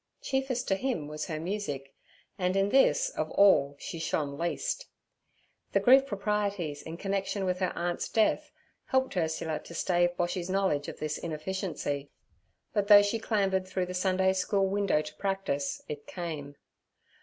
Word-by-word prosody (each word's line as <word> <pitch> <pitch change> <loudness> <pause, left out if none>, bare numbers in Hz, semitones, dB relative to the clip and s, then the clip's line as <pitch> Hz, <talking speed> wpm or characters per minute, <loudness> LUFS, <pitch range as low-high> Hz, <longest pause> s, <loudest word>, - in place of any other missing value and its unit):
Chiefest 265 -2 -1
to 195 - +3
him 220 - -2
was 150 0 -5
her 155 -3 -3
music, 160 -7 -4 0.4
and 185 -1 0
in 195 +1 +2
this, - - +4
of - - -3
all, 145 -8 +5
she 165 - -6
shone 150 -3 -1
least. - - -2 0.9
The - - +4
grief 265 +2 +6
proprieties 200 - -1
in 160 +1 -7
connection 195 +1 -2
with 180 0 0
her 185 - 0
aunt's 175 0 -2
death 220 -1 +1 0.3
helped 260 -4 +1
Ursula 160 -2 -1
to 170 - -11
stave 175 0 +1
Boshy's 175 +1 -1
knowledge 185 -7 +1
of - - -6
this 155 0 -3
inefficiency; 155 -3 -3 0.6
but 205 -1 +1
though 205 -1 +9
she 205 +3 0
clambered 195 -4 0
through 185 -1 -1
the 180 - -6
Sundayschool 190 +1 +2
window 195 -5 +1
to 150 - -8
practise, 195 -8 -2
it 145 -1 -7
came. 155 -5 -5
185 Hz, 155 wpm, -29 LUFS, 160-205 Hz, 0.9 s, though